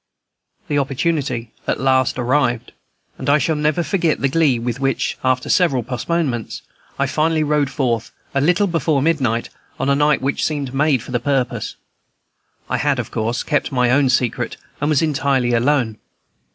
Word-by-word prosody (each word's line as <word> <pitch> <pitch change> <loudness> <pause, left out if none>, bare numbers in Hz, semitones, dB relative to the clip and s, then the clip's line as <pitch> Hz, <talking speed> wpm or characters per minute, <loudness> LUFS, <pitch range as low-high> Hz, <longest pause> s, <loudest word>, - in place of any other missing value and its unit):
The 145 -1 +1
opportunity 135 -4 -1 0.2
at - - 0
last 130 -1 +2
arrived, 125 -2 0 0.5
and - - -2
I 145 - +6
shall 160 +2 0
never 150 +3 +1
forget 170 -3 0
the 135 - +1
glee 145 -3 +3
with 120 +1 -3
which, 135 0 0
after 130 -1 +1
several 140 -10 +2
postponements, 125 0 -2 0.3
I - - +1
finally 155 0 +1
rode 150 -2 +1
forth, 120 -5 -1 0.2
a 135 - +1
little 180 +7 +3
before 160 -6 +1
midnight, 130 -8 0 0.3
on 135 - 0
a 140 - +4
night 150 0 +3
which 135 +1 0
seemed 145 -4 -2
made 135 -3 +2
for - - -10
the 120 - 0
purpose. 130 0 -1 0.9
I - - -1
had, 145 -1 +1
of 120 -4 -4
course, 115 +1 -1
kept 145 - 0
my 125 -2 +2
own 135 0 +3
secret, 125 -2 0 0.2
and 145 - 0
was 155 0 +3
entirely 135 -5 +1
alone. 120 -3 +1
135 Hz, 165 wpm, -19 LUFS, 125-150 Hz, 0.9 s, I